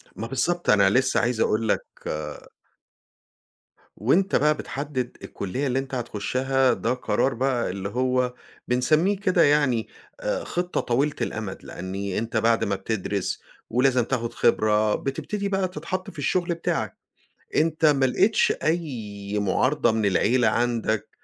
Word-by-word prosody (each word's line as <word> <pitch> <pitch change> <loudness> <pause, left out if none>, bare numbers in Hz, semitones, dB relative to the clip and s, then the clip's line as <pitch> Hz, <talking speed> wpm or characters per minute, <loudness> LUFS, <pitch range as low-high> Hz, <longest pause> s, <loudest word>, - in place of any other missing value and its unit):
ما 115 - -5
بالضبط، 175 +7 -1
أنا 100 -2 +6
لسّه 130 +5 +2
عايز 120 -1 0
أقول 110 +1 +1
لك - - +1 2.1
وأنت 175 - +2
بقى 150 +1 +4
بتحدِّد 135 -3 -4
الكُلّية 125 +9 -3
اللي 130 +1 +1
أنت 135 0 -5
هتخشّها 130 +3 +1
ده - - -1
قرار 130 +1 0
بقى 125 0 0
اللي 95 +1 -4
هو 125 +2 0 0.3
بنسمّيه 155 +11 +2
كده 185 -4 +3
يعني 145 -6 +3 0.3
آآ - - -2
خِطّة 175 0 -2
طويلة 140 +5 0
الأمَد، 105 -4 -4
لإنّي 95 +1 -5
أنت 115 +1 -2
بعد 115 +1 +3
ما 100 - 0
بتدرِس 100 -1 -3 0.3
ولازم 125 +1 +3
تاخُد 120 -1 -2
خبرة، 105 0 +2
بتبتدي 200 +9 -3
بقى 195 -1 +1
تتحَط 180 +2 -5
في 165 - -11
الشُغل 175 +5 0
بتاعك. 165 - -2 0.6
أنت 160 0 +2
ما 140 -3 +4
لقيتش 200 - +3
أي 110 -11 -2
مُعارضة 120 +6 +2
من 110 -1 0
العيلة 110 +6 +3
عندك، 115 -3 0
125 Hz, 135 wpm, -25 LUFS, 110-150 Hz, 2.1 s, أنا